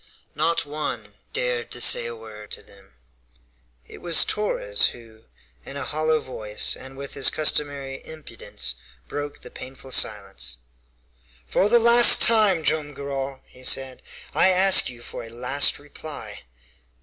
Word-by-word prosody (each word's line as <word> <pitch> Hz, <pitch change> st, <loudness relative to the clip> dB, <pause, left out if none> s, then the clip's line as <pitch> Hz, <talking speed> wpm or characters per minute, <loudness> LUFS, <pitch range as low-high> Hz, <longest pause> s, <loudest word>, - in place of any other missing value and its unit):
Not 165 Hz, -2 st, 0 dB
one 145 Hz, -8 st, -5 dB, 0.2 s
dared 125 Hz, -1 st, -2 dB
to 120 Hz, -, -5 dB
say 120 Hz, -1 st, +4 dB
a 120 Hz, -, -7 dB
word 110 Hz, -2 st, -12 dB
to -, -, -6 dB
them. 100 Hz, -9 st, -19 dB, 0.9 s
It -, -, -13 dB
was 170 Hz, -2 st, +3 dB
Torres -, -, 0 dB
who, 115 Hz, -2 st, -13 dB, 0.4 s
in 140 Hz, -, -8 dB
a 140 Hz, -, -4 dB
hollow 155 Hz, +1 st, 0 dB
voice, 110 Hz, -6 st, -2 dB
and 135 Hz, 0 st, -12 dB
with 140 Hz, 0 st, -7 dB
his 135 Hz, -, +2 dB
customary 140 Hz, -3 st, -1 dB
impudence, 105 Hz, -, -7 dB, 0.3 s
broke 145 Hz, -, -6 dB
the -, -, -11 dB
painful 130 Hz, 0 st, -11 dB
silence. 95 Hz, -, -1 dB, 0.9 s
"For 190 Hz, -, +1 dB
the 240 Hz, -, +5 dB
last 235 Hz, +1 st, +8 dB
time, 210 Hz, -7 st, +4 dB
Joam 150 Hz, -1 st, 0 dB
Garral," 135 Hz, -1 st, -5 dB
he 130 Hz, -, -15 dB
said, 130 Hz, 0 st, 0 dB, 0.3 s
"I -, -, +4 dB
ask 190 Hz, -2 st, +5 dB
you 120 Hz, -1 st, -12 dB
for -, -, -8 dB
a 115 Hz, -, -10 dB
last 125 Hz, +4 st, +1 dB
reply!" 145 Hz, -, -10 dB
135 Hz, 145 wpm, -23 LUFS, 115-155 Hz, 0.9 s, last